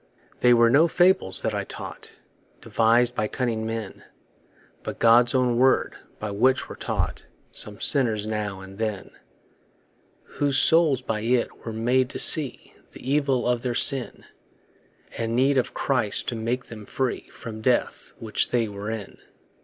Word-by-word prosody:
They 125 - +4
were 120 -1 +5
no 155 +6 +5
fables 175 - +2
that - - -1
I - - -2
taught, - - -9 0.5
Devis'd 115 +2 +2
by 105 -3 -1
cunning 115 -2 -3
men, 110 -3 -6 0.8
But - - -7
God's 120 +2 +4
own 125 -2 +1
word, 130 +1 +2 0.2
by 105 -1 -5
which 130 +6 +1
were - - -9
caught - - -4 0.2
Some 105 -1 0
sinners 115 -7 0
now 105 -3 -4
and 95 +1 -12
then. 110 -3 -4 1.1
Whose 140 -2 -1
souls 150 -4 +3
by 110 -3 -3
it 120 +1 -2
were - - -3
made 125 +3 0
to - - -6
see 150 -6 +2 0.2
The - - -12
evil 140 -4 +1
of 120 -1 0
their 120 -1 -3
sin; 135 -1 +3 0.9
And 115 0 -2
need 135 +2 +3
of 125 - -4
Christ 120 -7 0
to 120 - -4
make 120 +3 -3
them 110 -3 -11
free 130 -2 -3
From 110 -2 -9
death, 125 +2 -1
which 110 -2 0
they 120 -2 0
were 100 +1 -7
in. 110 -3 -7
120 Hz, 155 wpm, -24 LUFS, 110-130 Hz, 1.1 s, were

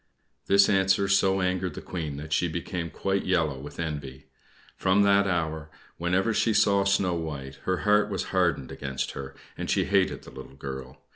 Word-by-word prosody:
This 100 0 +6
answer 95 0 +3
so 95 -1 +3
angered 90 -2 -1
the - - -5
Queen 80 -6 -4
that 75 +1 -5
she 90 - +2
became 85 +1 -4
quite 95 +3 -1
yellow 80 -7 +1
with 75 +3 -10
envy. 70 -5 -5 0.5
From 95 +2 +3
that 100 0 +4
hour, 80 -3 -2 0.3
whenever 95 +6 +1
she 110 0 +2
saw 100 -1 +4
Snow 100 -2 +2
White, 70 -5 -5
her 95 -1 0
heart 105 0 +4
was 95 -3 -3
hardened 85 -8 +1
against 65 -1 -4
her, 70 0 -8 0.2
and - - -5
she - - +2
hated 95 -1 +1
the - - -12
little 65 +1 -11
girl. 65 -2 -8
90 Hz, 175 wpm, -27 LUFS, 75-95 Hz, 0.5 s, This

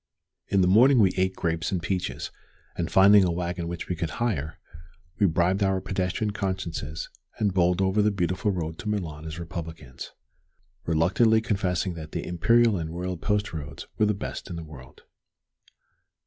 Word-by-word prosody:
In 100 - +2
the 90 - +4
morning 125 +8 +6
we 100 -5 +5
ate 95 0 +1
grapes 80 -2 -1
and 95 - 0
peaches, 90 +1 -3 0.4
and 85 -2 -2
finding 100 +1 +7
a 90 - +2
wagon 85 0 -2
which 85 -1 -5
we 90 - -2
could 80 -1 -3
hire, 90 -9 -1 0.6
we 100 - +5
bribed 90 +4 +1
our 95 -1 +2
pedestrian 95 +3 -2
consciences 95 -6 -3 0.3
and 105 -3 +1
bowled 90 0 +2
over 95 +2 +2
the 105 - +4
beautiful 95 +1 -1
road 80 -4 -3
to 110 - -4
Milan 80 -7 -3
as 80 0 -6
republicans, 80 -5 -7 0.8
reluctantly 95 +8 +3
confessing 95 -5 -1
that 80 -2 -9
the - - -3
imperial 115 +5 +3
and 80 -2 -4
royal 90 +2 -3
post 105 +3 -1
roads 70 -3 -6
were 105 - +4
the 105 - +1
best - - -6
in 85 - -5
the 85 - -6
world. 70 -5 -13
90 Hz, 170 wpm, -26 LUFS, 85-100 Hz, 0.8 s, finding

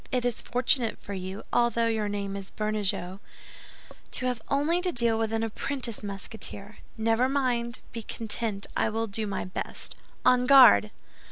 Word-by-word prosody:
It 250 -1 0
is 245 -2 0
fortunate 245 -1 +1
for 200 - -8
you, 190 +2 -5
although 235 -1 +3
your 220 -2 0
name 200 -1 -3
is 195 -1 -7
Bernajoux, 205 -3 -2 0.9
to 255 - 0
have 250 -3 -1
only 310 +6 +1
to 360 0 0
deal 235 -5 +2
with 225 -1 0
an 225 0 0
apprentice 235 +1 -2
Musketeer. 200 +1 -4 0.2
Never 225 +3 +2
mind; 245 -3 -1
be 230 - -5
content, 220 -2 -2
I - - +2
will 225 +1 -1
do 215 0 -3
my 200 - -3
best. 185 - -5 0.3
On 250 0 +4
guard!" 255 -6 +8
225 Hz, 160 wpm, -27 LUFS, 205-245 Hz, 0.9 s, guard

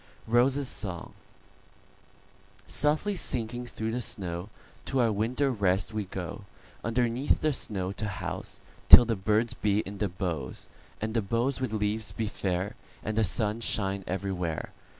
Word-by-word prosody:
ROSES' 130 +4 +3
SONG"SOFTLY 150 - -5
sinking 120 -6 -1
through 110 -1 -3
the 125 +2 -2
snow, 90 -3 -2 0.4
To 135 - 0
our 115 -2 +4
winter 125 +7 +1
rest 95 -3 +1
we 105 -2 -2
go, 95 +2 -6 0.4
Underneath 120 +3 +1
the 155 -1 +2
snow 95 -7 -2
to 110 +2 -4
houseTill 105 +4 +5
the 115 -1 0
birds 105 +4 +1
be 105 0 +1
in 100 0 -8
the 105 - 0
boughs, 85 -5 -4 0.3
And 110 +1 -3
the 115 - +2
boughs 115 +7 0
with 130 - -1
leaves 105 -1 +1
be 110 - -2
fair, 95 -1 -2 0.3
And 110 - -2
the 110 - +3
sun 105 +3 0
shine 100 -3 -1
everywhere. 90 -4 -2
110 Hz, 140 wpm, -29 LUFS, 95-120 Hz, 0.4 s, houseTill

